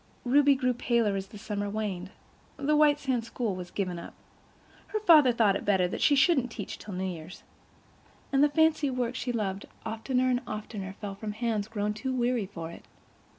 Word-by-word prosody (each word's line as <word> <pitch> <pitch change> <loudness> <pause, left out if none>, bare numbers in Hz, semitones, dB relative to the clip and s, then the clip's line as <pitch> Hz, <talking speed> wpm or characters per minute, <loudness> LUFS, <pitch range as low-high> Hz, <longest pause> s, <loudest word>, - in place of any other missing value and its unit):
Ruby 280 +2 +5
grew 255 -1 +1
paler 235 -4 +1
as 195 0 -3
the 210 - -11
summer 205 0 -3
waned; 200 -4 -3 0.5
the 290 +2 +1
White 300 -1 +5
Sands 255 -5 -1
school 230 -5 -2
was 180 -1 -7
given 180 -4 -3
up—"her 430 - -10
father 310 -10 +7
thought 220 -4 +3
it - - -3
better 190 -3 +3
that - - -5
she 290 - +5
shouldn't 270 -3 +3
teach 220 -3 -7
till 205 -3 -7
New 185 - -2
Year's"—and 185 - -6
the 295 - +5
fancy 315 -1 +3
work 250 -2 -1
she 255 -1 -3
loved 200 -4 -3 0.2
oftener 250 +3 0
and 245 0 +1
oftener 210 -3 -5
fell 205 -2 -5
from 210 +1 -5
hands 220 -2 -1
grown 210 -1 -2
too 260 +5 -3
weary 240 -4 0
for 165 -4 -7
it. - - -12
225 Hz, 185 wpm, -28 LUFS, 200-260 Hz, 0.5 s, father